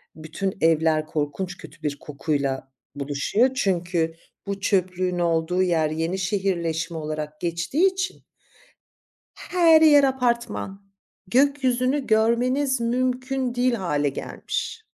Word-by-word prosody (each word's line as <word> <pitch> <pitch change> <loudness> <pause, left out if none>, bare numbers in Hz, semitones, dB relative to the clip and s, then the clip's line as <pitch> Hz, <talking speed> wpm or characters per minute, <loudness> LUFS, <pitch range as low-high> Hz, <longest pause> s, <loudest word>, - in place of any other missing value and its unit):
bütün 160 +5 -4
evler 160 -1 +3
korkunç 170 +5 -3
kötü 180 - -13
bir 145 -1 -2
kokuyla 140 -2 -3 0.2
buluşuyor. 145 - +1
Çünkü 175 -6 0 0.3
bu 200 0 -3
çöplüğün 185 -2 0
olduğu 170 +1 +1
yer 165 -4 +1
yeni 165 +4 -2
şehirleşme 170 -4 -1
olarak 155 0 -5
geçtiği 175 - +1
için 370 -1 -4 1.1
her 335 -3 +4
yer 290 -3 +7
apartman. 235 -6 -2 0.3
Gökyüzünü 260 +2 +2
görmeniz 245 +4 +2
mümkün 255 +1 -1
değil 250 0 +2
hâle 150 -8 0
gelmiş. 445 - -5
185 Hz, 105 wpm, -24 LUFS, 160-250 Hz, 1.1 s, yer